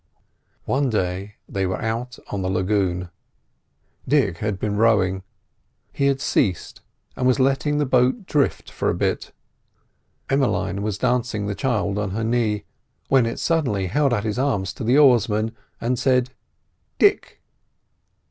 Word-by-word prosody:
One 135 0 +1
day 95 -1 -2
they 95 -1 -1
were 95 - -2
out 120 +2 -3
on 100 - -2
the 95 - -1
lagoon. 95 -2 0 1.0
Dick 110 - +2
had 105 -2 -2
been 105 +2 -2
rowing; 100 -4 +3 0.7
he 140 - +1
had 135 -1 +1
ceased, 95 - -1 0.3
and 125 - 0
was 130 +2 +3
letting 135 +3 +2
the 150 - +1
boat 130 - +2
drift 145 -5 0
for - - -1
a - - 0
bit. - - -1 1.0
Emmeline 110 -8 0
was 105 -1 -2
dancing 120 -3 0
the 100 - -2
child 105 -5 -1
on 105 -1 -1
her 115 - -1
knee, 110 -3 0 0.4
when 130 -4 +4
it 115 - -4
suddenly 130 - 0
held 140 +9 +1
out 110 -3 0
its 110 +2 -2
arms 100 -10 0
to - - -7
the 120 +5 +3
oarsman 115 -5 +3 0.2
and 120 +1 -1
said: 125 -1 +2 0.7
"Dick!" - - +2
115 Hz, 145 wpm, -22 LUFS, 100-130 Hz, 1.0 s, when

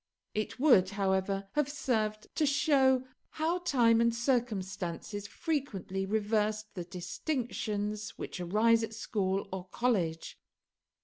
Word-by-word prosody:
It 215 +4 -3
would, 245 -11 +6
however, 195 0 0
have 295 -2 +1
served 220 -7 -1
to 305 - +2
show 270 -3 +4 0.3
how 325 +3 0
time 235 -9 +4
and 235 0 +3
circumstances 205 -5 -2
frequently 200 - -3
reversed 215 0 0
the 180 -3 -5
distinctions 210 - -3
which - - -6
arise 220 +6 +3
at 225 0 -4
school 195 -3 -1
or 190 -1 -5
college. 185 -7 -1
215 Hz, 115 wpm, -31 LUFS, 195-250 Hz, 0.3 s, would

